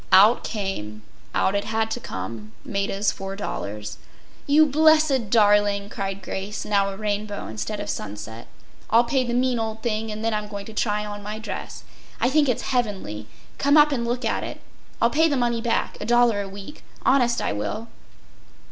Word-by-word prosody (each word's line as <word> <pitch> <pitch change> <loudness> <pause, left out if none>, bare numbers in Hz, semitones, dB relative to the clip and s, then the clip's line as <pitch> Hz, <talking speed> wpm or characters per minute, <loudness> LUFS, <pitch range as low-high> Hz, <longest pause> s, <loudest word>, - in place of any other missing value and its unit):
Out 205 +5 +7
came—out 150 - -3
it 200 0 0
had 220 0 -1
to - - -2
come—Maida’s 195 - -3
$4. 105 - -5 0.5
“You 300 +2 +6
blessed 305 -5 +4
darling,” 205 -2 +4
cried 195 -1 -4
Grace, 195 +2 -4
now 200 -1 +2
a 195 - -6
rainbow 210 -1 -3
instead 110 - -4
of 205 - -4
sunset. 105 +2 -6 0.4
“I’ll 230 +2 +6
pay 255 +2 +1
the 240 -1 -2
mean 250 -1 +2
old 220 0 -4
thing 220 -2 -1
and 215 +1 -4
then 225 - +1
I’m 210 0 -2
going 200 -1 -6
to 220 - -9
try 210 -1 0
on 205 0 -6
my 210 +1 -5
dress. 220 - -6 0.4
I 245 - +2
think 295 -1 +4
it’s 245 - -1
heavenly. 190 - -2 0.3
Come 285 +2 +4
up 300 0 +7
and 250 -4 0
look 240 +1 -2
at 225 - 0
it. - - -6 0.4
I’ll 235 - +3
pay 320 +2 +4
the 285 -3 +1
money 240 -2 +1
back, 230 -1 -1
a - - -3
dollar 240 -3 +4
a 195 - -6
week—honest 240 +4 -1
I - - -1
will. 155 - -3
215 Hz, 175 wpm, -24 LUFS, 195-240 Hz, 0.5 s, Out